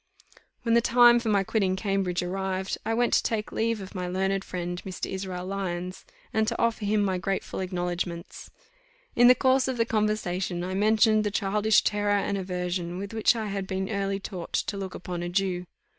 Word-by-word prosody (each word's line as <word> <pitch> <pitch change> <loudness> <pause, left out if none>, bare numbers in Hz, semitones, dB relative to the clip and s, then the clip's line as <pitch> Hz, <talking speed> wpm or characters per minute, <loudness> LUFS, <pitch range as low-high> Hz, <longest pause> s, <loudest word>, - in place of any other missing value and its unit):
When 230 - +1
the 235 - +5
time 240 0 +6
for 230 -2 -2
my 200 -2 +3
quitting 190 -2 +1
Cambridge 190 -3 -1
arrived, 190 +1 -2
I 225 - -1
went 240 +1 +1
to - - +5
take 215 -2 -2
leave 225 -1 0
of 190 - -9
my 180 -2 -3
learned 190 +2 0
friend 175 -1 -4
Mr. 185 -2 -4
Israel 185 -2 -4
Lyons, 185 -2 -4 0.3
and 220 0 +2
to 230 - -2
offer 230 -2 +1
him 210 0 +2
my 190 -2 0
grateful 195 +1 -3
acknowledgments. 175 -2 -4 0.7
In 245 - +7
the 250 - +8
course 260 0 +3
of 260 -2 -2
the 230 - +2
conversation 195 -5 -1
I 185 +1 -3
mentioned 215 +2 +4
the 210 - 0
childish 210 +1 +2
terror 205 -1 +1
and 200 0 -1
aversion 180 -2 -3
with 200 +3 -6
which 220 +2 +3
I 220 -1 -2
had 195 -1 -3
been 190 +2 -2
early 195 -1 -1
taught 185 -3 -7
to - - -1
look 195 -2 -5
upon 180 -1 -5
a 175 - -3
Jew. 180 -1 -1
195 Hz, 195 wpm, -27 LUFS, 180-215 Hz, 0.7 s, the